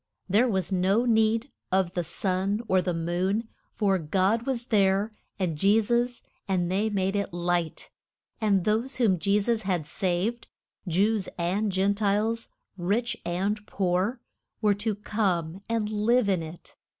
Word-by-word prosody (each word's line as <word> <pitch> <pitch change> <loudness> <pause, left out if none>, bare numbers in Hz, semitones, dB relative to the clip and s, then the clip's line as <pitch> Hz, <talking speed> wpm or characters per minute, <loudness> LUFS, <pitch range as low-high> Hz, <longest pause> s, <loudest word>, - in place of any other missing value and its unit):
There 210 +6 +4
was 190 -5 -1
no 190 +5 +2
need 225 +2 +2 0.2
of 185 -2 +2
the 175 - -1
sun 190 +5 -1
or 185 -1 +3
the 180 - -1
moon, 180 +6 -1 0.2
for 195 -3 +1
God 190 - +1
was 245 -3 -1
there 200 +1 +3 0.2
and 180 -5 -1
Je 200 +8 +4
sus, 240 +2 0 0.2
and 180 -2 0
they 205 +4 +1
made 195 -1 0
it 200 -1 -1
light. 175 -1 -2 0.5
And 200 -5 +2
those 230 +5 0
whom 210 -8 +2
Je 200 +3 +2
sus 230 +1 0
had 185 -6 -1
saved 190 +8 -1 0.4
Jews 195 +4 +1
and 190 +5 0
Gen 190 +2 +2
tiles, 215 +3 0 0.3
rich 225 +7 0
and 195 +5 -1
poor 190 +6 0 0.4
were 210 -2 +3
to 205 +1 -2
come 190 -5 -1
and 225 -2 0
live 215 +2 +2
in 185 -3 +2
it. 160 +1 -10
200 Hz, 150 wpm, -27 LUFS, 185-220 Hz, 0.5 s, There